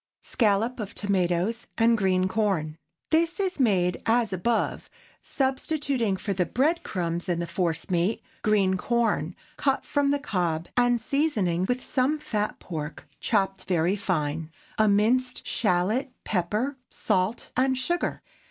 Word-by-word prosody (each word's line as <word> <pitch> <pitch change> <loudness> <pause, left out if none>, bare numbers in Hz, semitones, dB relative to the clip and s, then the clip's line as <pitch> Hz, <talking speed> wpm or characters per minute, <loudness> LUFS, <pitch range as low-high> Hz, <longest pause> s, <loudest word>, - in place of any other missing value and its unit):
SCALLOP 225 +2 +1
OF 205 -2 -5
TOMATOES 195 +2 0
AND 230 0 +4
GREEN 185 -3 +2
CORN. 195 -6 0
✠ 155 +1 -11 0.3
This 330 +4 +2
is 380 -4 -1
made 185 -8 +2
as 225 -3 +2
above, 220 +6 -1 0.3
substituting 265 -5 -1
for 200 +1 -2
the 180 -2 0
bread 310 - +1
crumbs 175 - -3
in 175 - +1
the 170 - -1
force 170 -1 -2
meat, 180 +5 +1 0.2
green 195 -3 +2
corn 215 -7 0 0.2
cut 275 -1 +1
from 285 -1 +1
the 285 - +2
cob, 175 - -1
and 245 -1 +3
seasoning 220 - +1
with 250 +1 -1
some 270 +4 +1
fat 215 -8 -2
pork 155 -3 -6
chopped 195 -3 0
very 175 +1 +1
fine, 160 -5 -2 0.3
a 215 - +5
minced 230 +5 +2
shallot, 215 +7 +1
pepper, 215 +9 -1
salt, 200 +1 -1
and 260 +1 +2
sugar. 345 +7 -1
210 Hz, 140 wpm, -26 LUFS, 180-255 Hz, 0.3 s, a